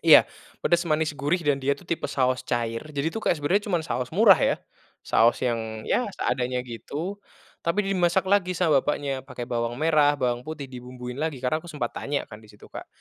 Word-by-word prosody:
Iya. -, -, +8 dB, 0.4 s
Pedas 175 Hz, 0 st, +3 dB
manis 155 Hz, -1 st, +1 dB
gurih, 145 Hz, +6 st, 0 dB
dan 145 Hz, -1 st, +3 dB
dia 140 Hz, -, +2 dB
tuh -, -, -16 dB
tipe 170 Hz, -, -2 dB
saos 130 Hz, -1 st, +1 dB
cair. 115 Hz, -1 st, -1 dB
Jadi 145 Hz, +1 st, -1 dB
tuh, 225 Hz, -, -3 dB
kayak, -, -, +2 dB
sebenarnya 180 Hz, +8 st, +1 dB
cuman 175 Hz, -3 st, +1 dB
saos 125 Hz, -1 st, -2 dB
murah, 200 Hz, -2 st, +7 dB
ya. -, -, +2 dB, 0.5 s
Saos 115 Hz, +1 st, +3 dB
yang, 110 Hz, -3 st, -2 dB
ya, 250 Hz, -, +1 dB
seadanya 125 Hz, -1 st, -1 dB
gitu, 150 Hz, -, -6 dB, 0.4 s
tapi 180 Hz, +5 st, +1 dB
dimasak 180 Hz, 0 st, +2 dB
lagi 190 Hz, -2 st, +2 dB
sama 165 Hz, -5 st, +3 dB
bapaknya, 140 Hz, -2 st, -2 dB
pakai 130 Hz, -3 st, -7 dB
bawang 120 Hz, -1 st, -2 dB
merah, 150 Hz, -2 st, +4 dB
bawang 120 Hz, -1 st, 0 dB
putih, 150 Hz, -3 st, -5 dB
dibumbuin 125 Hz, 0 st, -8 dB
lagi. 155 Hz, -3 st, -2 dB
Karena 130 Hz, +5 st, +1 dB
aku -, -, -13 dB
sempat 140 Hz, -6 st, -3 dB
tanya 140 Hz, 0 st, -2 dB
kan, 105 Hz, -, -9 dB
di 110 Hz, -, -16 dB
situ, 105 Hz, -, -16 dB
Kak. -, -, -8 dB
145 Hz, 200 wpm, -25 LUFS, 125-170 Hz, 0.5 s, Iya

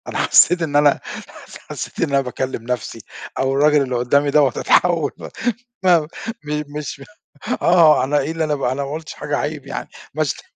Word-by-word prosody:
أنا -, -, -4 dB
حسّيت 180 Hz, 0 st, +4 dB
إن 150 Hz, -3 st, -2 dB
أنا 145 Hz, -1 st, +4 dB, 0.7 s
حّسيت -, -, -7 dB
إن 165 Hz, -, +1 dB
أنا 140 Hz, 0 st, +2 dB
باكلّم 130 Hz, -2 st, -4 dB
نفسي، 120 Hz, -2 st, -4 dB, 0.4 s
أو 135 Hz, 0 st, +1 dB
الراجل 150 Hz, +1 st, +4 dB
اللي 130 Hz, -2 st, -2 dB
قُدّامي 140 Hz, +4 st, +2 dB
دوّة 145 Hz, -2 st, +4 dB
أتحوّل 165 Hz, +5 st, +2 dB
والّا -, -, -9 dB, 0.5 s
ما 180 Hz, -2 st, +5 dB, 0.4 s
م 150 Hz, 0 st, -3 dB
مش 145 Hz, -2 st, -6 dB, 0.6 s
آه 165 Hz, -6 st, +5 dB
أنا 145 Hz, +3 st, +1 dB
إيه 145 Hz, +3 st, -2 dB
اللي 165 Hz, 0 st, -2 dB
أنا 145 Hz, -5 st, -1 dB
أنا 140 Hz, +2 st, -2 dB
ما 140 Hz, -, -6 dB
قُلتِش 155 Hz, 0 st, -6 dB
حاجة -, -, -3 dB
عيب -, -, -4 dB
يعني، -, -, -6 dB, 0.2 s
ما -, -, 0 dB
شت -, -, -3 dB
145 Hz, 180 wpm, -20 LUFS, 130-155 Hz, 0.7 s, ما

